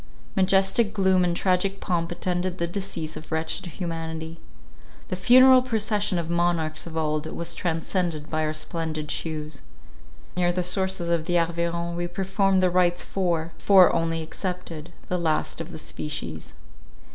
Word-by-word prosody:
Majestic 195 +3 +3
gloom 190 -2 +3
and 175 -1 0
tragic 190 +1 +1
pomp 170 -1 -1
attended 180 +1 -2
the 170 - 0
decease 170 -3 -4
of 155 +2 -10
wretched 160 +3 -1
humanity. 165 -1 -5 0.7
The - - -1
funeral 255 +7 +7
procession 210 -5 0
of 170 -1 -2
monarchs 170 -2 0
of 160 -1 -6
old, 155 -1 -1
was 170 - -3
transcended 165 -2 -2
by 155 0 -1
our 155 - -1
splendid 155 -1 -3
shews. 155 -2 -4 0.7
Near 175 -1 +2
the 180 0 -1
sources 185 -1 -1
of 165 -2 +1
the 175 -1 +2
Arveiron 170 0 -1
we 175 0 -2
performed 190 +1 +1
the 180 - +3
rites 175 -1 +2
for, 170 -4 -1
four 190 -3 +6
only 165 -1 0
excepted, 175 -2 -5 0.2
the 180 - -1
last 160 0 -1
of 165 +2 -7
the 160 - -7
species. 80 - -6
175 Hz, 150 wpm, -25 LUFS, 160-185 Hz, 0.7 s, funeral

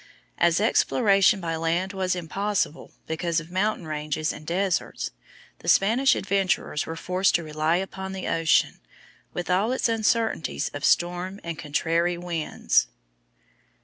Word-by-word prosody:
As 170 0 +4
exploration 200 -2 +3
by 165 -2 -3
land 170 +4 -1
was 185 -1 0
impossible 180 0 -2
because 165 +1 -1
of 165 +1 -11
mountain 190 -1 0
ranges 155 0 -2
and 155 - -11
deserts, 185 +1 -1 0.5
the - - -12
Spanish 235 +7 +4
adventurers 195 -6 0
were 165 - -4
forced 185 +3 +1
to 170 - +1
rely 155 +1 0
upon 190 +1 -4
the 190 -1 -5
ocean, 165 -1 +2 0.5
with 175 - -4
all 200 +6 +2
its 260 - +1
uncertainties 225 -5 0
of 145 - -8
storm 180 +3 +1
and 170 -2 -5
contrary 165 +3 0
winds. 170 -3 0
175 Hz, 135 wpm, -25 LUFS, 165-195 Hz, 0.5 s, As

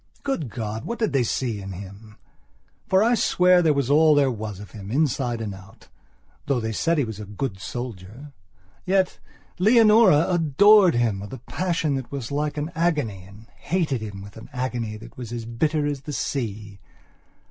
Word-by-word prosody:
Good 265 - -2
God, 110 -1 -5
what 235 - -4
did 220 -8 -1
they 135 - +3
all 125 - +1
see 115 -4 -2
in 95 0 -7
him? 100 +3 -11 0.7
for 190 +2 +4
I 235 +2 +3
swear 180 -5 +4
there 160 -3 +3
was 140 -2 0
all 155 +1 +5
there 140 -2 +3
was 105 -4 -6
of 100 -2 -11
him, 100 -2 -9
inside 130 -3 0
and 105 -3 -4
out; 95 0 -15 0.6
though 140 -3 +1
they 110 -1 -3
said 165 +9 0
he 145 - +2
was 110 -3 -6
a 105 - -6
good 105 0 -5
soldier. 120 +4 -7 0.5
Yet, 190 0 +1 0.4
Leonora 215 -5 +6
adored 180 - +5
him 115 -5 +1
with 100 +3 -8
a - - -5
passion 165 +3 -2
that 130 -3 -7
was 140 -3 -5
like 150 +1 -2
an 150 +3 -3
agony, 150 - -1
and 100 +3 -15
hated 160 -9 -1
him 100 -3 -7
with 100 +1 -12
an 110 - -11
agony 125 -4 -3
that 115 +1 -13
was 120 -3 -7
as 120 -1 -5
bitter 150 +6 0
as 145 -2 -2
the 150 +2 -7
sea. 105 -8 -4
130 Hz, 190 wpm, -24 LUFS, 110-160 Hz, 0.7 s, Leonora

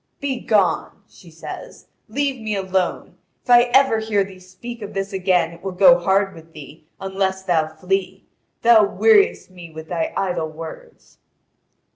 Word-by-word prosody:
"Begone," 245 -7 0
she - - -18
says; - - -10 0.2
"leave 270 +1 -2
me 215 -1 -3
alone. 190 -2 -2 0.2
If 245 - -3
I 240 0 +8
ever 255 -2 +3
hear 215 -2 0
thee 190 -1 -12
speak 220 +6 -10
of 205 - -8
this 195 +1 -3
again 185 -3 +1
it 170 0 -14
will 190 -1 -4
go 180 -2 +6
hard 195 +2 +1
with 165 0 -15
thee, 155 +1 -13
unless 190 0 -2
thou 165 -4 +1
flee. 185 +4 -3 0.4
Thou 230 -2 +6
weariest 410 - +3
me 175 -2 -12
with 160 0 -11
thy 170 -2 -2
idle 175 -4 -2
words." 160 +1 -12
190 Hz, 155 wpm, -21 LUFS, 175-220 Hz, 0.4 s, I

